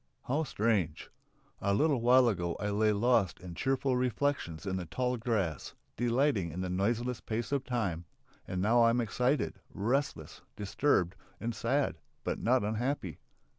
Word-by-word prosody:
How 145 +5 0
strange! 105 - 0 0.5
A 100 0 +1
little 145 -1 +2
while 125 +1 +6
ago 85 -6 0
I 105 +1 -1
lay 105 +1 +3
lost 105 -3 +2
in 90 -1 -8
cheerful 135 +6 0
reflections 125 - -1
in 95 -1 -1
the 90 -2 -5
tall 125 +7 -1
grass, 105 - -2 0.2
delighting 120 - +1
in 90 +4 -4
the 90 -1 -2
noiseless 115 +6 0
pace 115 +2 -3
of 140 -2 +1
time, 100 -10 -2 0.4
and 90 0 -2
now 115 +3 +4
I 115 - +6
am 120 +1 +2
excited, 125 +5 0
restless, 110 - -2
disturbed, 100 -2 +1 0.2
and 115 +1 -2
sad, - - 0 0.2
but - - -2
not 125 0 +2
unhappy. 110 - -2
115 Hz, 155 wpm, -31 LUFS, 95-125 Hz, 0.5 s, while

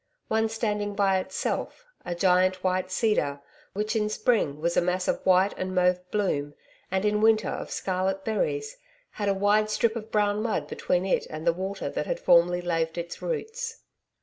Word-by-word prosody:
One 220 0 +2
standing 210 -2 -2
by 195 -2 +3
itself, 190 - -3 0.2
a 175 -1 -4
giant 185 +1 +3
white 185 0 0
cedar, 185 -9 0 0.3
which 215 +3 -2
in 210 -1 +1
spring 215 - +1
was 170 +2 0
a - - +4
mass 180 +1 -1
of - - 0
white 185 +2 +4
and 185 0 -3
mauve 180 0 +3
bloom 150 -9 -1 0.3
and 190 +2 0
in 210 0 +2
winter 220 -1 +4
of - - -5
scarlet 190 +1 -2
berries, 435 - -1 0.3
had 205 -1 -2
a 195 - +2
wide 205 +2 +3
strip 220 +1 +1
of 220 -1 -6
brown 210 -1 +1
mud 225 0 -1
between 180 +1 -1
it 190 - 0
and 155 +1 -6
the 170 - +4
water 190 +2 -4
that - - -3
had - - -2
formerly 175 - +4
laved 165 -1 -1
its 170 0 -5
roots. 465 0 -4
195 Hz, 180 wpm, -27 LUFS, 180-215 Hz, 0.3 s, a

